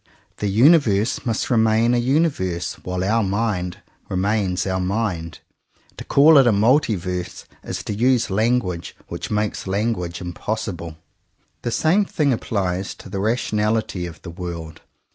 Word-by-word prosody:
The 105 - -2
universe 115 - +3
must 115 +3 -1
remain 115 0 +3
a 120 - +3
universe 120 - 0
while 90 0 -3
our 110 +4 +2
mind 95 -3 -2 0.3
remains 95 -1 0
our 95 -1 -1
mind. 90 -4 -2 0.6
To - - -6
call 150 +1 +6
it 135 - +5
a - - +5
"multiverse" 100 - 0 0.2
is - - -5
to - - -3
use 120 +1 +2
language 100 -5 0
which - - -5
makes 105 -1 -2
language 95 -4 -1
impossible. 90 -2 -5 0.6
The - - -2
same 170 - +2
thing 145 -7 +1
applies 95 -4 -2
to - - -12
the 95 - -4
rationality 105 -3 0
of 80 -2 -12
the 85 - -7
world. 85 -3 -7
105 Hz, 140 wpm, -21 LUFS, 90-115 Hz, 0.6 s, call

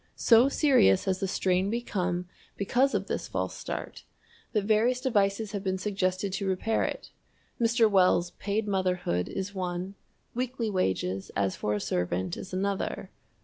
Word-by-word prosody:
So 235 +3 +5
serious 260 - +4
has 190 -1 0
the 195 - -1
strain 185 +1 +1
become 185 -6 -2 0.3
because 255 +7 +2
of - - 0
this - - -3
false - - -3
start - - -6 0.5
that 210 -3 +1
various 220 +4 +2
devices 205 -4 +1
have 200 -2 -4
been 190 -1 0
suggested 190 -1 -1
to 195 0 -2
repair 190 +4 0
it - - -4 0.5
Mr. 230 -1 +4
Wells' 180 -3 +3
"Paid 210 +2 -2
Motherhood" 180 - 0
is 195 +1 -4
one; 180 0 -3 0.4
weekly 245 -2 -2
wages 95 - -1
as 95 -2 0
for 105 - -1
a - - -1
servant 90 -2 -1
is 190 - -8
another. 195 +1 -2
195 Hz, 150 wpm, -28 LUFS, 180-215 Hz, 0.5 s, So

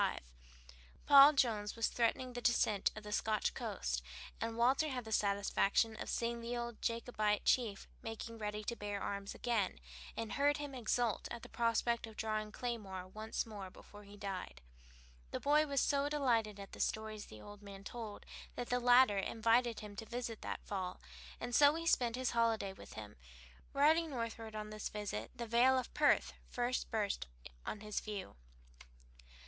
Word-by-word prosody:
Paul 280 +1 +10
Jones 220 -7 +1
was 230 - +1
then - - -7
threatening 245 +2 +1
a 245 - -3
descent 220 -4 +3
on 215 - -8
the 210 - -7
Scotch 215 0 +1
coast, 60 -1 -2 0.4
and 225 0 -2
Walter 265 +6 +3
had 250 -4 -3
the 220 - -7
satisfaction 200 +2 +2
of - - -5
seeing 235 0 -1
the 240 +1 -3
old 235 -1 -5
Jacobite 225 -3 0
chief 225 -6 +2
making 225 0 -6
ready 210 0 -3
to 235 - -2
bear 205 -2 -3
arms 200 0 -4
again, 230 -6 0 0.4
and 225 -1 -3
heard 290 +1 +3
him 290 -1 -5
exult 240 -2 0
at 235 - -6
the - - -9
prospect 235 0 +1
of 220 - -12
drawing 215 -1 -2
claymore 205 -7 -4
once 215 +3 -3
more 205 -4 -7
before 205 +2 -14
he 205 0 -13
died. 185 - -5 0.7
The - - -3
boy 300 +2 +4
was 280 -1 +1
so 285 +1 +2
delighted 230 -8 +1
at 195 - -8
the - - -10
stories 220 -1 -2
the 110 - -11
old 205 0 -11
man 200 -1 -10
told 220 -2 -7 0.3
that 245 - -4
the 245 - +2
latter 245 -4 +6
invited 230 +3 +2
him 210 -1 -8
to 225 - -5
visit 235 -2 -4
him - - -6
that - - -5
fall, 185 -3 -3 0.4
and 245 +1 -4
so 290 +3 +7
he 330 0 -4
spent 245 -7 +3
his 255 0 0
holiday 225 -4 +1
with 190 - -12
him. 105 -1 -9 0.5
Riding 315 +4 +4
northward 230 -4 -4
on 215 0 -5
this 215 -1 -4
visit 200 - -4
the 235 - -4
vale 240 +3 +5
of 255 - -3
Perth - - +3 0.2
first 245 +1 -1
burst 205 - -1 0.4
on 210 - -4
his 210 -1 -2
view. 205 - -6
225 Hz, 175 wpm, -36 LUFS, 205-245 Hz, 0.7 s, Paul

